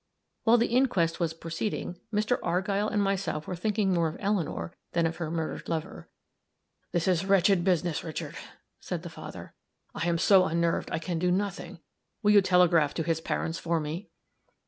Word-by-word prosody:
While 235 +1 +6
the 235 - +3
inquest 190 -11 +2
was 165 -2 -1
proceeding, 170 +2 -4
Mr. 215 +3 +1
Argyll 195 +4 0
and 205 -2 +1
myself 190 -6 -1
were 185 - -4
thinking 200 +1 0
more 170 -2 +2
of 160 - -5
Eleanor 185 - -1 0.2
than 170 -1 +2
of 165 0 -2
her 170 -3 -3
murdered 160 -1 -4
lover. 160 -2 -4 0.8
"This 175 0 0
is 180 -2 +2
wretched 195 -2 +4
business, 175 -3 +1
Richard," 160 -2 -5 0.4
said - - -5
the - - -7
father. - - -9 0.4
"I 170 - -2
am 170 -1 +2
so 185 +1 +5
unnerved 170 0 0
I - - 0
can 165 0 -3
do 180 +1 +1
nothing. 180 -3 -2 0.4
Will 210 - +5
you 205 -1 +7
telegraph 175 -5 +4
to 165 - -1
his 160 0 -1
parents 165 0 -2
for 170 -1 0
me?" 160 +5 -5
175 Hz, 175 wpm, -28 LUFS, 165-195 Hz, 0.8 s, you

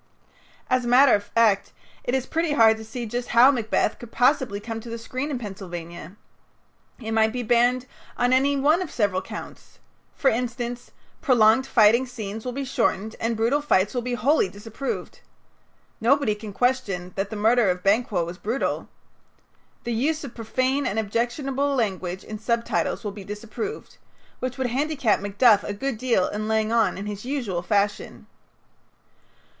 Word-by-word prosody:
As 255 0 +1
a - - -4
matter 255 +2 +6
of 205 - +2
fact, 215 -4 +2 0.3
it 245 - 0
is 260 -1 -1
pretty 325 0 -1
hard 225 -5 +6
to 220 - -9
see 235 +2 -6
just 240 +2 -4
how 255 +4 +8
"Macbeth" 225 -4 0
could 240 -1 -11
possibly 250 -5 +2
come 225 +1 -5
to 235 +1 -10
the 230 - -4
screen 255 +5 -4
in 280 - -2
Pennsylvania. 180 -5 -8 0.8
It 225 -2 -5
might 220 0 +3
be 250 +1 -3
banned 245 +2 +2 0.3
on 245 +1 +2
any 280 +2 +3
one 305 +6 +3
of 365 - -4
several 200 -5 0
counts. - - -10 0.4
For 270 - +3
instance, 245 +1 -3 0.3
"Prolonged 250 -2 +4
fighting 235 +2 +4
scenes 220 -3 -6
will 250 - -2
be 275 +2 -4
shortened, 220 -4 -1
and 230 0 -1
brutal 235 +7 +2
fights 210 -9 +2
will 245 - -1
be 245 0 -2
wholly 260 -4 +2
disapproved." 220 +7 -6 0.8
Nobody 270 0 +3
can 210 0 -8
question 200 -7 -1
that 195 +1 -3
the 220 - -6
murder 220 0 +3
of 180 0 -1
Banquo 200 -3 +2
was 175 +2 -8
brutal. 230 +6 -2 0.9
"The 240 - -2
use 300 +7 0
of 275 - -8
profane 255 +4 -1
and 205 - -2
objectionable 260 +6 -1
language 190 -6 -2
in 215 -1 -7
subtitles 235 +2 -1
will 205 - -3
be 200 0 -9
disapproved," 215 - -7 0.4
which 255 0 -4
would 255 -2 -1
handicap 275 -4 +1
Macduff 205 +2 +4
a 205 - -4
good 265 +1 -3
deal 235 -7 +2
in 215 +1 -4
laying 220 0 +1
on 225 -6 +2
in 200 - -5
his 205 -1 -6
usual 240 -10 -2
fashion. 200 +3 -1
230 Hz, 170 wpm, -24 LUFS, 210-255 Hz, 0.9 s, how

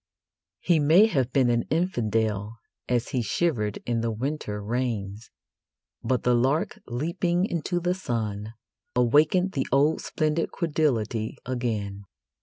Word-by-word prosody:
He 170 -3 +3
may 160 +8 +6
have 135 - 0
been 125 -2 +3
an 120 0 +2
infidel 110 - 0 0.3
as 125 -1 0
he 130 -4 0
shivered 110 - 0
in 120 -1 0
the 115 - 0
winter 115 -2 -3
rains, 110 -2 -3 0.7
but 130 -2 0
the 125 - +3
lark 130 +6 +1
leaping 170 +8 0
into 175 -1 -2
the 180 +1 0
sun 110 - -4 0.4
awakened 150 +10 +3
the 135 -7 -2
old 145 +4 +3
splendid 155 +1 -1
credulity 120 - -1
again. 110 -6 -3
125 Hz, 125 wpm, -26 LUFS, 110-155 Hz, 0.7 s, may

